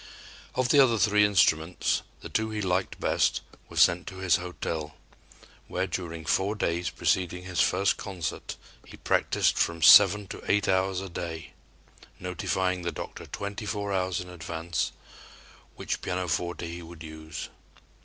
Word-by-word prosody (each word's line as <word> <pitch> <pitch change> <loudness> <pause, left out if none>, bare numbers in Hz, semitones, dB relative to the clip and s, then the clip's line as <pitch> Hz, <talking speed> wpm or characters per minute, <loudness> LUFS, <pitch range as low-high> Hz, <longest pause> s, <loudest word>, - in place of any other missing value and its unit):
Of 130 -1 +1
the 145 - +6
other 125 -4 +5
three 105 0 +4
instruments, 90 -4 +2 0.2
the - - -8
two 110 0 0
he 110 -1 -4
liked 95 -1 -1
best - - +1 0.3
were - - -10
sent 90 +1 +4
to 95 - -7
his 95 -2 +3
hotel, 80 -4 -5 0.7
where 90 +1 -1
during 85 -3 -5
four 100 +5 +1
days 85 -4 -1
preceding 90 -1 0
his 90 -1 -1
first 100 - +2
concert, 90 -5 -5 0.3
he - - -13
practiced - - +1
from 85 -1 0
seven 100 +4 +8
to - - -7
eight 100 0 +2
hours 95 0 +1
a 95 - -6
day, 80 -3 -6 0.7
notifying 90 0 -1
the 85 0 -2
"doctor" - - -8
twenty 100 +1 -5
four 100 0 -2
hours 90 -1 0
in 90 - -6
advance 85 -1 -3 0.8
which - - -3
pianoforte 90 -1 -2
he 85 +1 -6
would 85 -1 -11
use. 80 0 -7
90 Hz, 150 wpm, -27 LUFS, 85-100 Hz, 0.8 s, seven